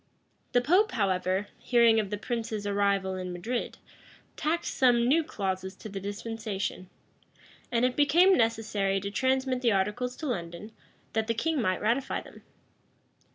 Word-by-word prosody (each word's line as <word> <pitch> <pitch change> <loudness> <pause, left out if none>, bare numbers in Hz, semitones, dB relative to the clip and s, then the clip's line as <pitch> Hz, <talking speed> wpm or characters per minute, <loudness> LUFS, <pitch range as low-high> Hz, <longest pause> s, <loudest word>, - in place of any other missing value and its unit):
The 245 - +4
pope, 365 - +3
however, 190 -2 0
hearing 235 -2 +4
of 205 -3 -2
the 210 - -3
prince's 220 -2 -3
arrival 200 -1 +1
in 185 -1 -5
Madrid, 225 +8 -3 0.6
tacked 325 +3 -1
some 240 -3 +3
new 320 +5 +4
clauses 190 - -3
to 215 - -9
the 195 -1 -5
dispensation;[] 205 -2 -4 0.8
and 240 0 +2
it 255 0 0
became 340 +7 +5
necessary 220 -4 +1
to 200 +1 -5
transmit 260 +2 0
the 235 -4 +3
articles 210 +6 -1
to 315 - -7
London, 175 - -4 0.4
that 220 -1 0
the 230 - 0
king 310 +4 0
might 185 -4 0
ratify 235 +5 0
them. - - -13
225 Hz, 150 wpm, -28 LUFS, 195-250 Hz, 0.8 s, became